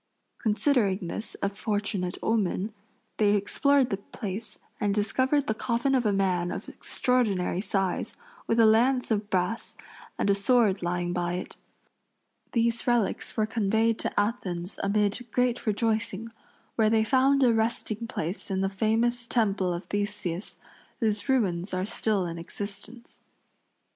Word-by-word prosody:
Considering 215 - +1
this 215 - -4
a 200 - +2
fortunate 200 -3 -2
omen, 210 -1 0 0.4
they 210 -1 +4
explored 265 +6 +2
the 195 - 0
place 210 +1 -4 0.2
and 205 -1 +1
discovered 260 +7 +1
the 220 - 0
coffin 240 +4 0
of 250 -4 +2
a - - +3
man 185 -3 +1
of - - -5
extraordinary 205 -8 0
size, 195 -3 -1 0.3
with 230 - +2
a 225 - +7
lance 245 +4 +3
of 210 -1 0
brass 185 +4 -1 0.4
and - - 0
a - - +5
sword 205 -1 +3
lying 175 0 -1
by 175 -1 -1
it. 180 - -5 1.0
These 235 0 +1
relics 240 -2 0
were 215 - +3
conveyed 220 +1 +1
to - - 0
Athens 195 -4 -2
amid 205 +3 +1
great 250 -2 0
rejoicing, 220 0 0 0.5
where 220 -2 +4
they 220 0 +3
found 270 +3 +3
a 240 -2 +5
resting 225 0 -1
place 180 -2 -4
in 190 -1 0
the 195 - +1
famous 230 +4 +1
temple 200 -6 +1
of 175 +2 -3
Theseus, 205 -3 -3 0.4
whose 215 +2 -1
ruins 190 -8 +1
are 185 +1 -1
still 210 -2 0
in 170 -1 -5
existence. 205 +6 -8
215 Hz, 145 wpm, -27 LUFS, 195-230 Hz, 1.0 s, a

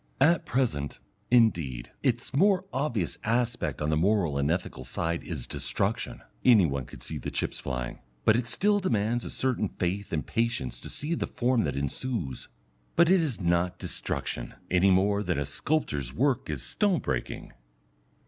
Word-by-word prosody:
At 160 +5 +4
present, 95 - 0 0.3
indeed, 85 - +2
its 120 0 0
more 190 +6 +4
obvious 125 - -1
aspect 120 -6 0
on 75 - +1
the - - +3
moral 85 -4 +2
and 70 +1 +1
ethical 90 +3 -2
side 85 0 -2
is 75 -9 -4
destruction, - - -2 0.2
any 110 -7 +7
one 70 -4 -2
can - - -12
see - - -4
the - - -4
chips - - -2
flying, 60 -2 -4 0.3
but 110 - +6
it 120 0 0
still 205 - +3
demands 115 - 0
a - - -5
certain 125 -6 0
faith 95 +3 -2
and 80 -3 -1
patience 115 - -1
to - - -8
see 150 +4 -2
the - - -1
form 120 -2 +1
that - - -2
ensues. 70 - -3 0.5
But 170 +1 +5
it 190 -2 +6
is 140 -10 -2
not 85 0 +1
destruction, - - -3 0.2
any 90 +2 +5
more 100 +2 +3
than 100 - -1
a 70 - 0
sculptor's 75 - -1
work 130 - +1
is 70 -5 -3
stone 190 - +2
breaking. 60 - -3
100 Hz, 165 wpm, -28 LUFS, 75-125 Hz, 0.5 s, any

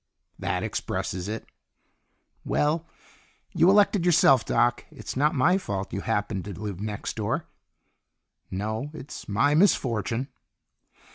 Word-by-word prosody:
"That - - -1
expresses 90 +1 -3
it." 110 +2 -4 1.0
"Well, 160 +3 0 0.7
you 170 0 +5
elected 200 -2 +4
yourself, 160 -8 +5
Doc. 120 +1 +1
It's - - -8
not 150 +4 +2
my 180 +8 +4
fault 100 - -4
you 100 - -2
happened 105 -3 -2
to 100 - -6
live 100 -3 -5
next 105 -1 -4
door." - - -2 1.0
"No. 110 +8 -3
It's 145 - -9
my 115 +9 +3
misfortune." 130 - +2
120 Hz, 120 wpm, -26 LUFS, 105-155 Hz, 1.0 s, you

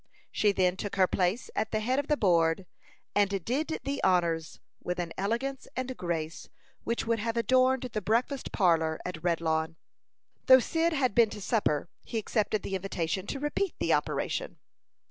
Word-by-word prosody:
She 210 - +3
then 185 -2 +1
took 205 +1 -4
her 190 -1 +5
place 185 +5 -1
at 220 - 0
the 215 - 0
head 255 +5 +1
of 285 - -3
the 300 - +2
board, 170 -3 +2 0.5
and 200 -3 +1
"did 305 +6 -1
the 280 0 -3
honors" 170 -3 +1 0.2
with 180 - -3
an 170 -2 -3
elegance 235 +7 -2
and 255 0 -3
grace 165 -4 -4 0.3
which 235 - -1
would 230 0 +1
have 230 +2 -2
adorned 255 +2 +3
the 225 -4 -3
breakfast 240 +6 0
parlor 160 -5 +2
at 175 -2 -5
Redlawn. 160 -2 0 0.7
Though 260 - +10
Cyd 325 +6 +1
had 260 -7 +1
been 230 -1 +5
to 210 - -7
supper, 195 -8 0 0.2
he 230 - -4
accepted 215 -1 0
the - - -5
invitation 190 -1 -2
to 275 - -3
repeat 295 +6 -1
the - - +1
operation. - - -1
205 Hz, 170 wpm, -29 LUFS, 175-255 Hz, 0.7 s, Though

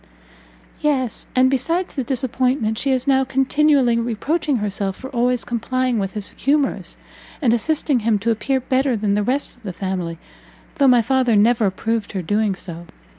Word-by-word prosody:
"Yes, 270 -6 -1
and 260 +1 +4
besides 330 +8 -1
the 270 - -2
disappointment, 250 -3 -1
she 275 - -1
is 255 -1 0
now 265 -1 +3
continually 270 -2 +2
reproaching 270 +6 -1
herself 200 -2 -2
for 265 - -9
always 245 -1 0
complying 250 +1 -1
with 195 -1 -3
his 210 -2 -3
humours, 285 0 0 0.4
and 245 -6 +2
assisting 285 +2 +1
him 220 -1 +1
to 225 +3 0
appear 245 +5 0
better 260 -1 0
than 205 -1 0
the 210 - +1
rest 255 +5 -2
of - - -25
his 190 -4 -6
family, 180 -3 -3 0.6
though 280 - +5
my 245 -2 +5
father 255 -1 +2
never 225 +1 +4
approved 220 +3 -2
her 190 -2 -3
doing 205 +2 0
so. 175 -2 -9
245 Hz, 170 wpm, -20 LUFS, 210-265 Hz, 0.6 s, though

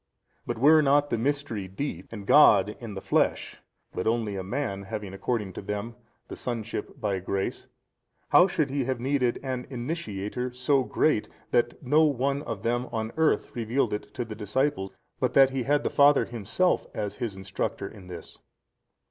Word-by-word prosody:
But - - -2
were 155 +6 +6
not 145 0 +3
the 115 - +1
Mystery 135 -6 -2
deep, 95 - -5
and 105 -3 -7
God 105 -7 +6
in 115 -4 -7
the 95 - -5
flesh, 95 - 0 0.4
but 90 - -2
[only] 110 -3 0
a 95 - -3
man 105 -1 -3
having 100 -1 -6
according 100 0 -2
to - - -6
them 105 +3 -4 0.3
the - - -7
sonship 115 +1 -5
by 100 -5 -1
grace, 95 +1 -3 0.6
how 180 - +7
should 155 -7 -1
he 140 -2 0
have 130 -1 -2
needed 125 -1 0
an 130 -2 -3
Initiator 125 - -4
35 125 - -17
so 135 +1 +3
great, 150 -9 +1 0.2
that 120 +2 +1
no 150 +5 +4
one 140 0 0
of 110 -7 -6
them 120 +2 0
on 110 0 -2
the - - -17
earth 160 -1 +1
revealed 120 0 0
it 105 - -5
to 120 - -2
the 110 - -7
disciple, 105 +1 -1 0.3
but 125 -1 0
that 135 -1 +7
he 135 -1 -1
had 145 +4 +1
the - - -1
Father 145 0 +5
Himself 120 - 0
as 105 -2 -3
his 115 -6 -3
Instructor 95 0 -4
in 95 -3 -12
this? 85 -2 -9
120 Hz, 180 wpm, -27 LUFS, 105-140 Hz, 0.6 s, how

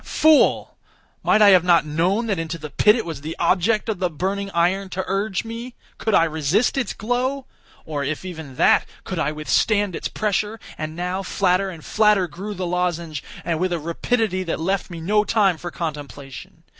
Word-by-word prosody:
Fool! 315 -1 +3 0.5
might 215 0 +4
I 205 - +8
have 185 -3 +6
not 170 -3 +4
known 175 +9 0
that 200 -6 -1
into 165 +1 -4
the 150 -2 -8
pit 210 +8 +5
it 230 - -2
was 160 -5 -6
the 160 +2 -5
object 195 +6 +2
of 215 -5 -2
the 180 - +1
burning 195 +5 -3
iron 190 +2 +1
to 190 0 -3
urge 195 +1 -1
me? 235 +2 -7 0.2
Could 220 -3 +1
I - - +6
resist 160 - +1
its 270 -3 -1
glow? 255 +4 -2 0.4
or, 145 -2 -3
if 155 +5 -3
even 160 -7 -8
that, - - +4 0.2
could 185 - -4
I 150 -2 0
withstand 190 +6 +1
its - - -3
pressure? 210 +1 -1 0.2
And 155 0 -5
now, 180 +2 -2
flatter 190 0 +1
and 165 -4 -10
flatter 210 -4 +3
grew 195 +6 -7
the 185 0 -3
lozenge, 170 -4 -2 0.2
with 175 +2 0
a 175 - 0
rapidity 185 +5 -1
that 170 -3 -3
left 190 +5 -1
me 170 -2 -7
no 210 +5 +2
time 205 -5 +2
for 175 - -5
contemplation. 145 -5 -7
185 Hz, 190 wpm, -22 LUFS, 165-210 Hz, 0.5 s, I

